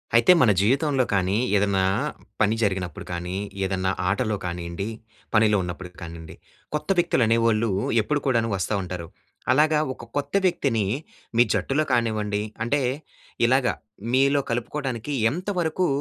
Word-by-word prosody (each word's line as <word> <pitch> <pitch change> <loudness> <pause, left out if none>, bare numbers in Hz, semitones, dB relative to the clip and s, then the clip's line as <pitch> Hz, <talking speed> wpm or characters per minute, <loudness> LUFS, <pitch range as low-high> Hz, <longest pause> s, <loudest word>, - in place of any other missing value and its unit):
అయితే 120 +7 +7
మన 120 -5 +6
జీవితంలో 135 +5 +2
కానీ 95 +1 +2 0.2
ఏదన్నా, 100 -1 +2 0.6
పని 105 +1 +3
జరిగినప్పుడు 95 -5 -2
కానీ, 90 +2 -4 0.3
ఏదన్నా 95 0 0 0.2
ఆటలో 110 0 0
కానియండి, 85 +3 -4 0.5
పనిలో 105 -1 +5
ఉన్నప్పుడు 90 +1 -6
కానియండి 85 -1 -8 0.4
కొత్త 150 - -4
వ్యక్తులు 170 -7 +2
అనేఓళ్ళు 115 0 +2 0.3
ఎప్పుడు 145 +7 0
కూడాను 115 -3 +2
వస్తా 95 +2 -2
ఉంటారు. 90 -2 -6 0.4
అలాగా 150 +3 +4
ఒక - - -13
కొత్త 145 +3 -2
వ్యక్తిని 130 - +1 0.5
మీ 120 - +8
జట్టులో 150 +3 0
కానివ్వండి, 105 -3 0 0.2
అంటే 140 +4 +1 0.7
ఇలాగ 130 +1 +3 0.5
మీలో 140 +2 +4
కలుపుకోటనికి 130 +2 -3 0.2
ఎంతవరకు 180 0 -1
115 Hz, 125 wpm, -24 LUFS, 95-140 Hz, 0.7 s, మీ